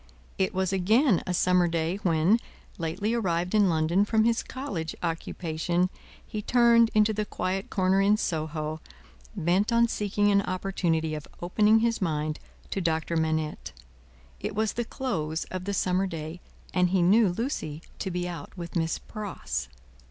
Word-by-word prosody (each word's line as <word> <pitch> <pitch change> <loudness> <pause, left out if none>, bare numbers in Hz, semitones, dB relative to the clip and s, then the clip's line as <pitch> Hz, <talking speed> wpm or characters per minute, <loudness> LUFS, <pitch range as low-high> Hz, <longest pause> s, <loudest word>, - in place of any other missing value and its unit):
It 190 +2 +2
was 190 -1 -1
again 210 - +3
a 180 - 0
summer 180 0 +3
day 165 +2 -1
when, 175 +3 +3 0.4
lately 185 +7 -1
arrived 180 -5 0
in 205 -3 +4
London 165 +4 +2
from 220 +1 +2
his 230 +1 +2
college 190 - -5
occupation, 170 +1 -1 0.3
he 215 - -5
turned 235 0 +5
into 215 0 +4
the 210 0 -1
quiet 190 -1 -3
corner 190 0 +2
in 205 +2 +4
Soho, 155 -3 -2 0.6
bent 185 +4 +1
on 235 0 +4
seeking 205 -1 +1
an 200 0 +4
opportunity 180 -4 -1
of 150 -1 -6
opening 210 +5 +3
his 230 -1 +1
mind 155 -3 -1 0.3
to 195 - -1
Doctor 165 -1 0
Manette. 160 -1 -1 0.7
It - - -4
was 220 0 0
the 240 - -2
close 165 - -2
of 185 -1 -4
the 200 - -2
summer 185 +1 +1
day, 165 0 -6 0.3
and 180 -1 +3
he 185 -1 +2
knew 205 +3 +5
Lucie 175 - -3 0.2
to 190 - -2
be 180 0 -2
out 170 0 -8
with 170 0 -7
Miss 165 -1 0
Pross. 75 - -5
185 Hz, 160 wpm, -27 LUFS, 165-210 Hz, 0.7 s, turned